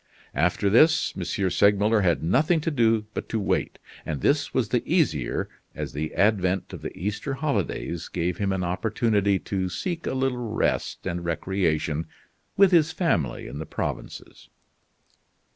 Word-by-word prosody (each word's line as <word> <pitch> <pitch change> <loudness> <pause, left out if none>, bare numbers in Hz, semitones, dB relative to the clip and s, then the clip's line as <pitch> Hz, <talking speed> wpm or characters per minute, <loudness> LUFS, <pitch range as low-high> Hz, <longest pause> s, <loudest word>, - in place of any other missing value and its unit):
After 90 +3 +1
this, 155 +10 +4
M. 95 - -4 0.3
Segmuller 105 +2 +3
had 85 -6 +1
nothing 150 - +3
to 165 - -1
do 115 -5 +2
but - - -5
to 115 - -1
wait, 100 - -1 0.3
and 75 -3 -3
this 145 - +1
was 120 -5 0
the 120 +1 +1
easier 110 - +1 0.3
as - - -5
the 75 +2 -4
advent 95 -3 +1
of - - -7
the - - -7
Easter 105 +9 -3
holidays 135 - -2
gave 85 +1 -2
him 100 -1 0
an 95 -1 -1
opportunity 100 +2 +1
to 95 0 -3
seek 170 - -4
a - - -1
little 130 -1 0 0.2
rest - - -1
and 85 0 -3
recreation 80 -3 -1 0.5
with 195 -1 +6
his 165 -4 +4
family 85 - 0
in 70 - -7
the 80 - -6
provinces. - - -6
100 Hz, 155 wpm, -25 LUFS, 90-130 Hz, 0.5 s, with